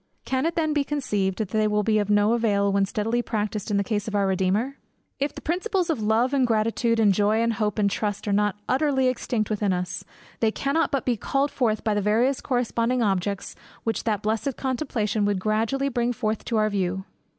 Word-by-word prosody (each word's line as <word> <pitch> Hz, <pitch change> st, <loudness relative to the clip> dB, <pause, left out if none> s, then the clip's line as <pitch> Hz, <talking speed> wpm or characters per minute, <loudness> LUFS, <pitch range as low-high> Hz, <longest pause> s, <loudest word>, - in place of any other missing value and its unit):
Can 260 Hz, +3 st, 0 dB
it 335 Hz, -, -2 dB
then 315 Hz, -2 st, +1 dB
be 295 Hz, -1 st, +2 dB
conceived, 210 Hz, -10 st, -1 dB
that 215 Hz, -4 st, -2 dB
they 215 Hz, +1 st, +1 dB
will 210 Hz, 0 st, +1 dB
be 215 Hz, 0 st, +2 dB
of 205 Hz, -1 st, -1 dB
no 205 Hz, +2 st, +4 dB
avail 200 Hz, -4 st, +2 dB
when 200 Hz, 0 st, +3 dB
steadily 225 Hz, +4 st, -1 dB
practised 215 Hz, -3 st, -3 dB
in 205 Hz, -, +1 dB
the 200 Hz, -, +2 dB
case 205 Hz, +1 st, -2 dB
of 210 Hz, -, -3 dB
our 200 Hz, -1 st, +2 dB
Redeemer! 195 Hz, +8 st, 0 dB, 0.4 s
If 280 Hz, +2 st, -1 dB
the -, -, -8 dB
principles 365 Hz, +1 st, 0 dB
of 275 Hz, -9 st, -2 dB
love, 225 Hz, +5 st, +2 dB
and 265 Hz, -3 st, +3 dB
gratitude, 230 Hz, +1 st, +1 dB
and 210 Hz, -3 st, +5 dB
joy, 210 Hz, +3 st, +2 dB
and 230 Hz, 0 st, +1 dB
hope, 210 Hz, -1 st, -1 dB
and 205 Hz, -1 st, +3 dB
trust, 205 Hz, +1 st, -2 dB
are 205 Hz, -, +1 dB
not 205 Hz, -1 st, +2 dB
utterly 265 Hz, -1 st, +2 dB
extinct 235 Hz, -3 st, -2 dB
within 205 Hz, -2 st, +1 dB
us, 180 Hz, 0 st, -3 dB, 0.4 s
they 225 Hz, -, +3 dB
cannot 280 Hz, +8 st, 0 dB
but 275 Hz, -, -1 dB
be 245 Hz, -3 st, +1 dB
called 275 Hz, +6 st, 0 dB
forth 220 Hz, -4 st, 0 dB
by 215 Hz, -, +1 dB
the 205 Hz, -, 0 dB
various 235 Hz, +6 st, +2 dB
corresponding 245 Hz, -1 st, 0 dB
objects 195 Hz, -1 st, -1 dB, 0.3 s
which 225 Hz, -, -1 dB
that 210 Hz, -3 st, 0 dB
blessed 220 Hz, +5 st, -1 dB
contemplation 235 Hz, -6 st, -1 dB
would 205 Hz, -1 st, +1 dB
gradually 225 Hz, +7 st, 0 dB
bring 245 Hz, -2 st, 0 dB
forth 220 Hz, -3 st, -2 dB
to 230 Hz, -, -1 dB
our 215 Hz, 0 st, +2 dB
view. 190 Hz, -1 st, -1 dB
220 Hz, 215 wpm, -25 LUFS, 205-255 Hz, 0.4 s, and